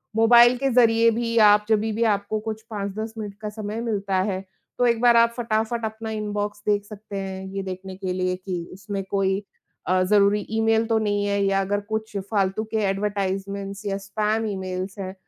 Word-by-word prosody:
Mobile 240 +2 +7
के 275 +1 0
ज़रिए 230 -1 +5
भी 230 0 -1
आप 210 0 +5
जभी 220 0 +2
भी 230 +2 0
आपको 205 +2 -3
कुछ 220 0 -5
5-10 215 +1 -4
मिनट 205 -2 -5
का 210 - -3
समय 215 +1 -5
मिलता 200 -4 -2 0.2
है। 190 +1 -4 0.3
तो 245 - +3
एक 235 -1 +2
बार 240 -1 +6
आप 235 0 +4
फटाफट 225 0 -1
अपना 220 0 -5
इनबॉक्स 210 -1 -3
देख 205 -1 +2
सकते 205 -1 -8
हैं 190 0 -5
ये 195 - -3
देखने 190 0 -6
के 185 -1 -3
लिए 185 0 0
कि 180 -2 -5
उसमें 195 0 -5
कोई 195 0 +1 0.4
अ, 185 0 +3
ज़रूरी 205 +1 +3
ईमेल 225 0 +3
तो 225 - +2
नहीं 205 -1 0
है 200 0 0
या 195 0 +2
अगर 205 +1 -1
कुछ 220 -1 -3 0.2
फ़ालतू 195 0 +1
के 220 - 0
एडवर्टाइज़मेंट 195 0 -2
या 195 -1 -1
स्पैम 215 +3 -1
ईमेल्स 190 0 -4
हैं। 185 -1 -4
205 Hz, 190 wpm, -24 LUFS, 195-220 Hz, 0.4 s, Mobile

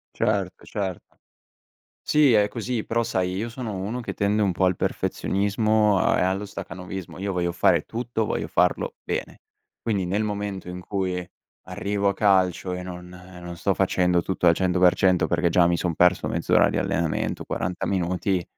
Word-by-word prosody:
Certo, 95 -2 -1
certo. 95 -4 -5 0.8
Sì, 150 -4 +4
è 105 -2 +4
così, 115 0 -3
però 115 +1 0
sai, 90 -4 -1
io 105 +5 -2
sono 115 -3 -5
uno 105 +6 -3
che 120 - -5
tende 105 +1 +1
un 100 -2 +2
po' 95 +2 0
al 90 -1 +2
perfezionismo 105 +1 +1
a - - +2
e - - +2
allo 95 +2 0
stacanovismo. 95 -1 -7
Io 100 0 -2
voglio 90 -1 -1
fare - - +3
tutto, 115 -1 -3
voglio - - -2
farlo 485 -1 +1
bene. - - -4 0.4
Quindi 100 -5 -1
nel 100 +4 0
momento 100 -3 -4
in 90 0 -6
cui 90 -2 -3 0.4
arrivo 100 0 -1
a 100 - +1
calcio 95 -3 +2
e 90 - -5
non 90 -1 -8
non 90 -1 -10
sto 95 +3 0
facendo 90 -2 +2
tutto 95 0 -1
al 85 - +7
100% 90 0 +3
perché 85 0 +1
già 85 +1 +4
mi 85 0 +2
son 85 0 -1
perso 90 +1 +3
mezz'ora - - +3
di - - -1
allenamento, 85 -1 -1
40 90 - -3
minuti, 90 0 0
95 Hz, 170 wpm, -24 LUFS, 90-105 Hz, 0.8 s, al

